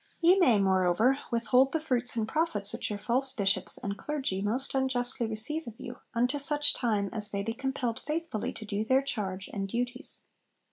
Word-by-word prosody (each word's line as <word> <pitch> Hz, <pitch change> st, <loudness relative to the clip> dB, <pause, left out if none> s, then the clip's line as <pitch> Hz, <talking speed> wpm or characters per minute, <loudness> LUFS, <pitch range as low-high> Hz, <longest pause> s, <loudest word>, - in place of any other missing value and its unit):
Ye 355 Hz, +3 st, +5 dB
may, 250 Hz, -, +5 dB
moreover, 190 Hz, +7 st, +3 dB
withhold 240 Hz, +3 st, +3 dB
the 320 Hz, -, +1 dB
fruits 250 Hz, -6 st, +1 dB
and 220 Hz, -2 st, -1 dB
profits 220 Hz, -10 st, 0 dB
which -, -, -3 dB
your 210 Hz, -, -3 dB
false 255 Hz, +5 st, +3 dB
Bishops 195 Hz, -5 st, +1 dB
and 200 Hz, 0 st, -3 dB
clergy 270 Hz, -11 st, -2 dB
most 240 Hz, +7 st, -1 dB
unjustly 255 Hz, -3 st, 0 dB
receive 230 Hz, +9 st, -3 dB
of 225 Hz, -, -8 dB
you, 245 Hz, 0 st, -8 dB, 0.2 s
unto 250 Hz, +5 st, +1 dB
such 290 Hz, 0 st, +3 dB
time 210 Hz, -5 st, 0 dB
as 215 Hz, -2 st, +1 dB
they 200 Hz, -1 st, -2 dB
be 225 Hz, +2 st, -2 dB
compelled 260 Hz, -2 st, -3 dB
faithfully 310 Hz, -7 st, -3 dB
to 220 Hz, -, -9 dB
do 205 Hz, 0 st, -2 dB
their 260 Hz, +4 st, +3 dB
charge 195 Hz, -8 st, -3 dB
and 195 Hz, -2 st, -3 dB
duties.' 245 Hz, +3 st, -2 dB
240 Hz, 185 wpm, -29 LUFS, 205-270 Hz, 0.2 s, Ye